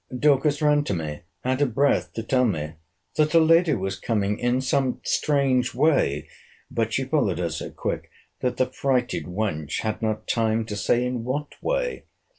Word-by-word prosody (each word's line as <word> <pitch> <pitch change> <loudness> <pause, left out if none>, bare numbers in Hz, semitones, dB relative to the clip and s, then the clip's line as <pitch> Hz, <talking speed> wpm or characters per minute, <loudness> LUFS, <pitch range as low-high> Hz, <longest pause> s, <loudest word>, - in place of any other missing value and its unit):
Dorcas 145 +2 +3
ran 150 -1 +4
to 100 - -1
me, 75 -3 -4 0.3
out 130 +2 0
of 130 -6 +1
breath, 140 +1 +2
to 115 - -4
tell 125 +2 +2
me, 75 -8 -1 0.5
that 155 +1 +3
her 165 - +7
lady 165 -1 +5
was 95 -2 -3
coming 105 -2 0
in 120 +1 +1
some 130 -1 0
strange 135 -5 +1
way; 125 - +2 0.4
but 115 -1 0
she 135 - 0
followed 130 - +1
her 85 -2 -1
so 80 - -5
quick, - - -4 0.3
that 125 - -1
the 130 - +3
frighted 130 -1 -1
wench 90 -6 -2
had 110 -1 -3
not 110 -1 -2
time 115 -1 +1
to 105 - -5
say 120 +4 +1
in 125 -2 -2
what 145 +4 -3
way. - - -1
125 Hz, 180 wpm, -24 LUFS, 105-140 Hz, 0.5 s, her